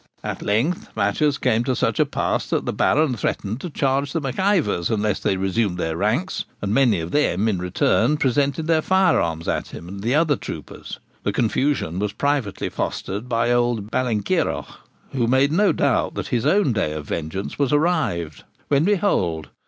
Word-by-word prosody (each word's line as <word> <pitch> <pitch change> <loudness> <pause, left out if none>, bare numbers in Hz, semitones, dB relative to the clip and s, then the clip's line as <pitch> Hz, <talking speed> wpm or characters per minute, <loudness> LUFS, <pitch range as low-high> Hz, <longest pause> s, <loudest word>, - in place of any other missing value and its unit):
At - - -4
length 120 +13 0
matters 150 -2 +1
came 120 -3 +1
to 130 -1 0
such - - 0
a - - +4
pass - - -1
that - - 0
the - - -2
Baron 150 -3 +2
threatened 110 +2 -3
to 180 - -5
charge 140 -1 0
the - - 0
Mac 135 0 -4
Ivors 190 - +1
unless 105 -3 0
they 95 - 0
resumed 95 0 0
their 80 -2 -2
ranks, 110 - -1
and 100 0 -2
many 125 -6 +3
of 80 +1 -5
them, 110 -8 +1
in 100 -5 0
return, 130 +11 +2
presented 140 +3 +1
their 160 -1 +3
firearms 155 - +2
at - - -1
him 85 - -10
and 100 +2 -7
the 120 +6 +1
other 155 -2 +3
troopers. - - -8 0.2
The 100 - -1
confusion 115 - 0
was 105 0 -2
privately 140 -3 -1
fostered 105 +6 -4
by 115 0 +1
old 120 -3 0
Ballenkeiroch, 115 -6 0 0.4
who 120 -4 0
made 130 +3 +3
no 200 +5 +3
doubt - - +1
that - - -4
his 120 -2 0
own 195 - +3
day 100 -8 -1
of 75 -1 -6
vengeance 85 - -4
was 140 -3 +1
arrived, 145 - 0 0.3
when, 140 0 +3
behold! 170 - +1
120 Hz, 180 wpm, -22 LUFS, 100-145 Hz, 0.4 s, a